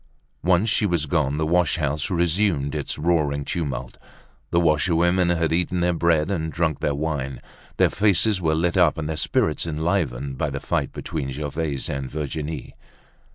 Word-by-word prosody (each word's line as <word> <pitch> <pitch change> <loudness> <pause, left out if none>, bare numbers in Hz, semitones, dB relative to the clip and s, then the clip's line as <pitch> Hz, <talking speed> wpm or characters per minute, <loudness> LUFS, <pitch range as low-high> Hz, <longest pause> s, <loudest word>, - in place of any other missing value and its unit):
Once 90 +4 +3
she 105 -1 +2
was 85 -4 0
gone, 75 -2 0
the 80 - 0
wash 85 0 +2
house 75 +1 -1
resumed 85 -4 +1
its - - -3
roaring 75 -3 +1
tumult. 65 -8 -4 0.5
The 85 - +2
washerwomen 85 +2 +3
had 80 -2 +1
eaten 90 +1 0
their 90 0 +2
bread 85 0 +2
and 80 -4 -2
drunk 80 -3 0
their 70 - 0
wine. 70 -4 -3 0.4
Their - - +4
faces 100 -1 +2
were 80 -2 +2
lit 85 +3 0
up 85 -4 +4
and 80 -1 -3
their 80 - -2
spirits 75 +2 0
enlivened 75 -5 -1
by 75 - 0
the 70 0 -4
fight - - -1
between 75 -5 -4
Gervaise 75 +1 -3
and 70 -2 -4
Virginie. 75 0 -4
80 Hz, 165 wpm, -23 LUFS, 75-85 Hz, 0.5 s, Their